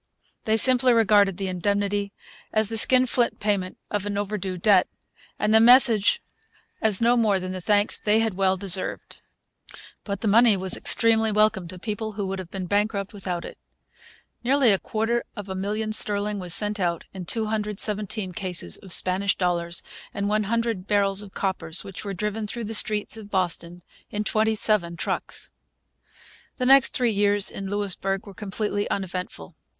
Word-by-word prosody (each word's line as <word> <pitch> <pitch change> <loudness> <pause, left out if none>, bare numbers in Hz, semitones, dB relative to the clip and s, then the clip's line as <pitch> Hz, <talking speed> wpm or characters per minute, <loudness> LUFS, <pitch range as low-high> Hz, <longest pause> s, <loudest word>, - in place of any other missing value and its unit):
They 220 0 +2
simply 255 +1 +5
regarded 205 -4 +3
the 195 - -3
indemnity 200 +2 -1 0.4
as 215 -1 +1
the 225 - -4
skinflint 250 0 +3
payment 200 -3 -2
of 205 -1 -2
an 205 -1 -3
overdue 200 -2 -3
debt, 190 0 +3 0.5
and 210 +1 0
the 220 - +7
message 235 - +5 0.6
as 215 -3 +3
no 235 +1 +4
more 215 -5 +2
than 185 0 -5
the 185 0 -6
thanks 205 +2 +2
they 210 +1 +2
had 225 -2 0
well 190 0 +1
deserved. 190 -1 -2 0.8
But 200 -2 -5
the 225 - -1
money 220 0 +5
was 190 0 +4
extremely 225 -1 +3
welcome 215 -3 +1
to 185 +2 -8
people 215 +2 -5
who 200 -1 -4
would 190 0 -4
have 185 -2 -8
been 190 -1 -5
bankrupt 205 +1 -1
without 180 -4 -5
it. - - -11 0.8
Nearly 260 -1 +3
a 195 - +2
quarter 225 +2 -2
of 205 -3 -7
a - - -3
million 210 +3 -3
sterling 205 -1 -1
was 180 -2 -5
sent 210 +3 +2
out 170 -2 -2
in 185 -2 -7
217 210 -2 -2
cases 180 - 0
of 190 - -14
Spanish 190 +2 +2
dollars 170 -2 -2 0.3
and 200 0 -2
100 215 -1 -1
barrels 200 -1 +1
of 200 -2 -12
coppers, 185 -3 -2
which 195 -2 -8
were 200 -2 -5
driven 210 +2 -3
through 235 +2 -3
the 220 - -5
streets 210 0 +2
of 210 -2 -11
Boston 175 -2 -2 0.3
in 210 0 -3
27 215 -5 0
trucks. - - -4 1.1
The 255 - -2
next 270 +1 +6
three 240 -3 +1
years 205 0 +1
in 195 0 -6
Louisbourg 195 -1 -1
were 200 - -11
completely 205 +1 -3
uneventful. 180 - -5
205 Hz, 165 wpm, -24 LUFS, 190-220 Hz, 1.1 s, the